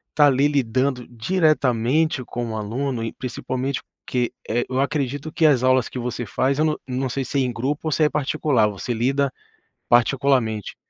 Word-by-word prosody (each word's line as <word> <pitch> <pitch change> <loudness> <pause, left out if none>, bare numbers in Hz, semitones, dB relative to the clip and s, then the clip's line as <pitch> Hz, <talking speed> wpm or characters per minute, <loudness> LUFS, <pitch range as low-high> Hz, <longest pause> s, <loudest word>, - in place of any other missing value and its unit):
tá 145 -1 +6
ali 140 +1 +3
lidando 130 -2 0
diretamente 135 0 +1
com 120 -1 -4
o - - -3
aluno 120 +3 -2
e 115 - -3
principalmente 130 +1 -3 0.2
porque, 125 -2 -1 0.2
eh, 120 +2 +1
eu 130 0 -1
acredito 140 +1 -1
que 160 - +2
as 135 -5 +4
aulas 130 -1 +3
que 125 - -6
você 120 0 -3
faz 135 +6 0
eu 155 - +3
não 155 -1 0
não 130 +1 -2
sei 135 +2 -2
se 140 - -3
é - - +3
em 125 -1 0
grupo 145 +7 -2
ou - - -3
se 155 +2 +2
é 150 - +4
particular, 145 -5 +1
você 105 +4 -4
lida 135 +4 +1 0.6
particularmente? 120 -3 +2
130 Hz, 185 wpm, -22 LUFS, 120-140 Hz, 0.6 s, tá